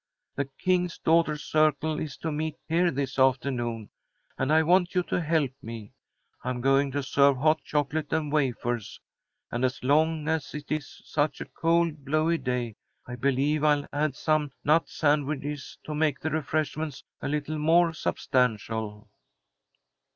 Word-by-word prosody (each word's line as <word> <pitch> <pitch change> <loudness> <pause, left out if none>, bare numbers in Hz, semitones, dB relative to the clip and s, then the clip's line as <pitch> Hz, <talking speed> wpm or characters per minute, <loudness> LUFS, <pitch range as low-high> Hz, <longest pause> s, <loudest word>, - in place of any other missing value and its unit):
The 140 - -1
King's 180 +5 -1
Daughters' 160 -2 +2
Circle 155 0 +2
is 150 -4 -5
to 160 - -3
meet 155 +1 -2
here 175 +2 +3
this 135 -2 -3
afternoon, 125 -4 +1 0.4
and 135 +2 -1
I 160 +1 +5
want 180 +2 +3
you 180 - +3
to 175 - -1
help 155 -4 +1
me. 115 -2 -8 0.5
I'm 125 -1 -2
going 135 +2 +3
to 145 0 -1
serve 140 0 +4
hot 155 +4 +2
chocolate 150 +1 -1
and 155 -2 0
wafers, 120 -6 -1 0.5
and, 120 +2 -2
as 130 -1 -1
long 155 +3 +2
as 160 -3 -1
it 150 -1 -7
is 155 -2 -4
such 145 -1 0
a - - -5
cold, 165 +1 0
blowy 155 +4 +1
day, 125 -4 -2 0.3
I 120 - -6
believe 140 +4 +1
I'll 145 -1 +3
add 145 -1 0
some 155 -1 +1
nut 155 +3 +3
sandwiches 145 -1 -1
to 155 - -5
make 150 -2 +1
the 160 - -3
refreshments 155 -1 -2 0.2
a - - -3
little 150 +1 -2
more 165 +2 +4
substantial." 110 -6 -1
150 Hz, 150 wpm, -27 LUFS, 135-155 Hz, 0.5 s, I